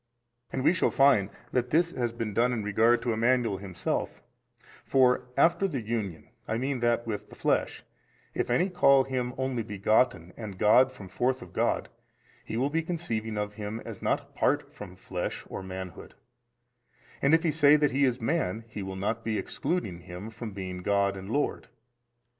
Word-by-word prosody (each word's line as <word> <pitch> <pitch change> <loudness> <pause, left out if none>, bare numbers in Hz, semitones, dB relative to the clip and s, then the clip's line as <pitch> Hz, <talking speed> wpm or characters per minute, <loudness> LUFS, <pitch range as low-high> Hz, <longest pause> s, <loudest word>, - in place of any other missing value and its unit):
And 130 - -2
we 165 - +5
shall 185 - +2
find 135 -8 +4 0.2
that 125 -1 0
this 170 +4 +3
has 120 -6 -1
been 115 -2 -4
done 120 +4 +3
in 110 -3 -2
regard 110 +4 +3
to 120 - 0
Emmanuel 115 -2 +2
Himself: 95 -2 -3 0.6
for 125 -1 +3
after 175 +4 +4
the 145 -8 -3
Union, 105 -7 -4 0.2
I 110 - -1
mean 130 +1 -1
that 120 0 +1
with 110 -3 -4
the - - -13
flesh, - - 0 0.5
if - - -1
any 180 +2 +2
call 140 -6 +5
Him 130 -2 -2
Only 130 -2 -1
Begotten 105 -3 +1
and 105 -5 -7
God 125 +6 +5
from 105 -7 -11
forth 125 +6 -1
of - - -14
God, - - 0 0.6
he 110 - -4
will 135 +4 +1
be 165 +2 +1
conceiving 115 -11 -3
of 105 0 -2
Him 105 +1 -5
as - - -8
not - - +1
apart - - -1
from 95 -3 -9
flesh 90 -1 -5
or - - -6
manhood, 95 -1 -8 1.1
and 140 +4 +5
if 160 - +1
he 165 - +2
say 150 -1 +6
that 150 -2 +3
He 140 +2 +2
is 130 -2 +2
man, 115 - -1
he 105 - -6
will 95 0 -5
not 105 +4 -2
be 110 -1 -1
excluding 105 - -2
Him 90 +4 -8
from 115 0 -6
being 95 -2 -5
God 100 0 +1
and 95 +1 -8
Lord 145 +5 -1
20. - - -25
115 Hz, 185 wpm, -28 LUFS, 100-135 Hz, 1.1 s, say